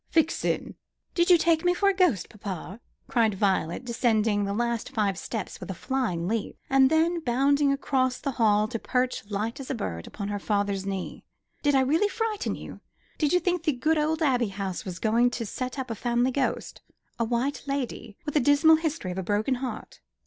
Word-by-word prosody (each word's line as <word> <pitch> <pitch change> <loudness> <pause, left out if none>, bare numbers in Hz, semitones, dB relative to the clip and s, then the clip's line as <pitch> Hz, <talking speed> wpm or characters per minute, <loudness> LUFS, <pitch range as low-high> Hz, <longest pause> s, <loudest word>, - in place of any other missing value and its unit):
"Vixen!" 325 0 +1 0.4
"Did 345 0 +2
you 355 - +8
take 325 -1 +2
me 355 0 +3
for 400 - +2
a 395 - +5
ghost, 355 - +2
papa?" 195 -1 -7 0.3
cried 225 -4 +2
Violet, 190 +1 0
descending 220 -3 +1
the 200 - -2
last 235 +2 -1
five 205 -3 0
stairs 215 +3 -5
with - - -8
a 190 - -3
flying 220 -9 -1
leap, 220 +1 -2
and 270 -1 +6
then, 330 +2 +2
bounding 280 +1 +2
across 260 -2 0
the 275 - -3
hall 215 -3 +3
to 230 -1 -3
perch, 255 +2 -1
light 215 +5 -2
as 270 - -7
a 270 - -1
bird, 85 - -4
upon 200 -1 -5
her 205 0 -2
father's 200 -1 -1
knee. 195 -1 -4 0.4
"Did 290 -1 +2
I 265 - +5
really 315 +10 +3
frighten 445 -1 -2
you? - - -9 0.4
Did 300 -2 +2
you 360 - +4
think 360 -1 0
the 315 -3 +1
good 305 +5 +1
old 315 +2 0
Abbey 250 -5 +2
House 195 -2 -4
was 180 -2 -5
going 230 +6 +3
to 240 -1 -4
set 255 +5 -4
up 260 -3 -4
a - - 0
family 240 +3 +1
ghost; 270 0 -2 0.4
a - - +2
white 245 +5 -1
lady, 270 -6 -4
with 295 - -4
a - - +6
dismal 290 +4 +5
history 315 - -3
of 180 - -4
a - - -3
broken 210 +7 0
heart? 250 -5 -6
245 Hz, 200 wpm, -27 LUFS, 205-295 Hz, 0.4 s, you